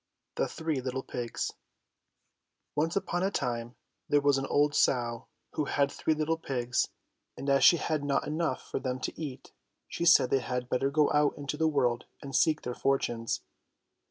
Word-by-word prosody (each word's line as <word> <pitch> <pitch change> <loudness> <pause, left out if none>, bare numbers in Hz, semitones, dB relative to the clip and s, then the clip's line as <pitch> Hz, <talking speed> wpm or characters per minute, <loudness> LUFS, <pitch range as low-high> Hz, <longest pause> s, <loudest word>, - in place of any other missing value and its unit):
THE - - 0
THREE 160 -4 -2
LITTLE 130 +1 -3
PIGS 120 -2 -4 1.2
ONCE 160 +3 0
upon 175 -3 -1
a 190 - +2
time 120 -8 -3 0.3
there 145 - +5
was 140 -1 +3
an 135 - -3
old 145 0 +2
sow 120 -5 +1 0.3
who 150 - -1
had 140 0 +1
three 160 - 0
httle 160 +1 -1
pigs, 125 -4 0 0.5
and 140 - -6
as 140 - +4
she 170 - +8
had 155 -2 -1
not 140 -1 0
enough 155 -3 -1
for - - -3
them 130 -1 -3
to - - -3
eat, 140 -5 -7 0.4
she 170 - -3
said 165 -6 +6
they 135 - +4
had 125 -1 -3
better 135 +3 +1
go 150 +1 +3
out 150 -1 +2
into 145 0 -4
the 160 +1 +2
world 125 -6 +1
and 135 -1 -6
seek 155 -1 +3
their 125 - -3
fortunes. 120 -4 0
140 Hz, 180 wpm, -30 LUFS, 125-155 Hz, 1.2 s, she